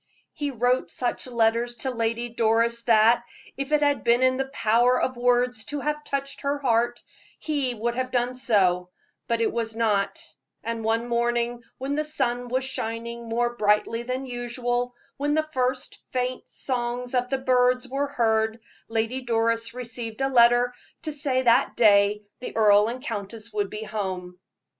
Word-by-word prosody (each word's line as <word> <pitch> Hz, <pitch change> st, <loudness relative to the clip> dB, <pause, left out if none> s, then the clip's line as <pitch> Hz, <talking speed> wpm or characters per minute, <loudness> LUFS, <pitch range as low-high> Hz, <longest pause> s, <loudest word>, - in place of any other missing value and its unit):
He 290 Hz, -1 st, -2 dB
wrote 250 Hz, 0 st, +1 dB
such 245 Hz, +1 st, -2 dB
letters 235 Hz, 0 st, +1 dB
to 260 Hz, +3 st, -3 dB
Lady 230 Hz, 0 st, -1 dB
Doris 230 Hz, 0 st, +1 dB
that, 230 Hz, +1 st, +5 dB, 0.3 s
if 275 Hz, +1 st, -4 dB
it 300 Hz, -1 st, +3 dB
had 285 Hz, -1 st, +2 dB
been 235 Hz, +2 st, +3 dB
in 255 Hz, 0 st, +3 dB
the 270 Hz, 0 st, -1 dB
power 245 Hz, -1 st, +3 dB
of 255 Hz, -, -1 dB
words 245 Hz, -1 st, +1 dB
to 290 Hz, -, -4 dB
have 300 Hz, +1 st, -2 dB
touched 275 Hz, -1 st, -4 dB
her 280 Hz, +1 st, 0 dB
heart, 240 Hz, -3 st, +1 dB, 0.4 s
his 280 Hz, -5 st, -1 dB
would 235 Hz, +2 st, -1 dB
have 255 Hz, +1 st, -2 dB
done 245 Hz, 0 st, 0 dB
so; 185 Hz, -8 st, +2 dB, 0.4 s
but 230 Hz, 0 st, 0 dB
it 225 Hz, -, +1 dB
was 225 Hz, -1 st, -2 dB
not; 215 Hz, -3 st, +1 dB, 0.4 s
and 230 Hz, 0 st, -3 dB
one 225 Hz, +2 st, 0 dB
morning, 240 Hz, 0 st, 0 dB, 0.2 s
when 270 Hz, +2 st, -3 dB
the 305 Hz, +1 st, 0 dB
sun 245 Hz, -5 st, -1 dB
was 255 Hz, +2 st, 0 dB
shining 235 Hz, -2 st, -5 dB
more 240 Hz, +1 st, 0 dB
brightly 210 Hz, +1 st, +2 dB
than 255 Hz, +2 st, -3 dB
usual, 245 Hz, 0 st, -2 dB, 0.2 s
when 290 Hz, +1 st, 0 dB
the 310 Hz, 0 st, +1 dB
first 255 Hz, 0 st, -1 dB
faint 255 Hz, 0 st, -3 dB
song 245 Hz, -1 st, -3 dB
of 250 Hz, -1 st, +1 dB
the 270 Hz, -, +1 dB
birds 250 Hz, -1 st, +2 dB
was 275 Hz, +2 st, -2 dB
heard, 220 Hz, -1 st, +1 dB, 0.3 s
Lady 225 Hz, +3 st, -1 dB
Doris 230 Hz, -1 st, 0 dB
received 235 Hz, -1 st, -5 dB
a 270 Hz, -, +2 dB
letter 240 Hz, 0 st, +5 dB, 0.3 s
to 310 Hz, -1 st, -3 dB
say 275 Hz, -3 st, 0 dB
that 235 Hz, 0 st, +3 dB
day 205 Hz, -1 st, +4 dB, 0.2 s
the 250 Hz, -, -6 dB
earl 210 Hz, -1 st, +6 dB
and 250 Hz, +3 st, -5 dB
countess 220 Hz, -1 st, -6 dB
would 205 Hz, -2 st, -1 dB
be 215 Hz, +1 st, -6 dB
at 210 Hz, -, -11 dB
home. 185 Hz, -4 st, -4 dB
240 Hz, 170 wpm, -25 LUFS, 225-255 Hz, 0.4 s, earl